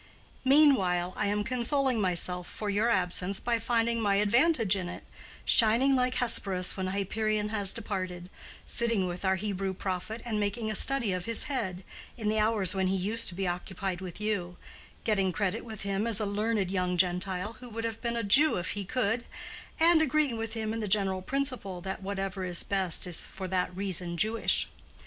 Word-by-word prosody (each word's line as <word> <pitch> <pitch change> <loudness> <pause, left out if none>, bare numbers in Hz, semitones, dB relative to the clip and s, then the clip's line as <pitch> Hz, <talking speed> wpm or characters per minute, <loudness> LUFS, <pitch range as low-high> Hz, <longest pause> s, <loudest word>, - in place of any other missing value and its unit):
Meanwhile 225 -11 +3
I - - -1
am 205 +1 -1
consoling 255 0 0
myself 180 -1 0
for 210 -1 -4
your 210 +4 +1
absence 185 -1 +2
by 235 -1 -1
finding 230 0 0
my 200 -2 +1
advantage 225 - +2
in 185 -2 -4
it—shining 235 +8 +2
like 250 0 +1
Hesperus 195 -6 +3
when 190 -1 -3
Hyperion 210 +2 -2
has 205 -3 +4
departed; 185 -4 -5 0.3
sitting 230 -5 +2
with 180 +1 -6
our 190 0 +2
Hebrew 195 -1 -3
prophet, 190 +4 -5
and 220 -3 -2
making 210 +2 -2
a - - -3
study 235 -2 +2
of 180 -1 -4
his 230 -1 +2
head, 195 -10 -4 0.3
in 215 -3 -2
the 215 0 +1
hours 210 -4 +4
when 190 -1 0
he 190 - 0
used 215 +5 -1
to 175 - -7
be 190 0 -2
occupied 180 +1 -4
with 180 -1 -8
you—getting 195 0 -3
credit 195 0 -2
with 220 -4 -8
him 200 +2 -2
as 225 -2 +4
a 215 - -1
learned 205 -1 -1
young 180 -2 -1
Gentile, 185 +3 0
who 250 -1 -10
would 230 0 -6
have 225 -1 -4
been 235 -1 -2
a 230 - -2
Jew 270 +9 +4
if 180 - -3
he 205 - -4
could 235 +1 -1 0.5
—and 330 0 +5
agreeing 305 -3 +1
with 225 0 -5
him 220 -1 -3
in 225 - -4
the 215 - -3
general 190 -2 +2
principle, 255 -6 -2
that 190 +1 -6
whatever 195 0 -4
is 175 -2 0
best 190 -3 +1
is 175 -2 +3
for 190 -1 -7
that 180 -1 -2
reason 180 -3 -2
Jewish. 220 +4 +1
205 Hz, 185 wpm, -28 LUFS, 185-230 Hz, 0.5 s, and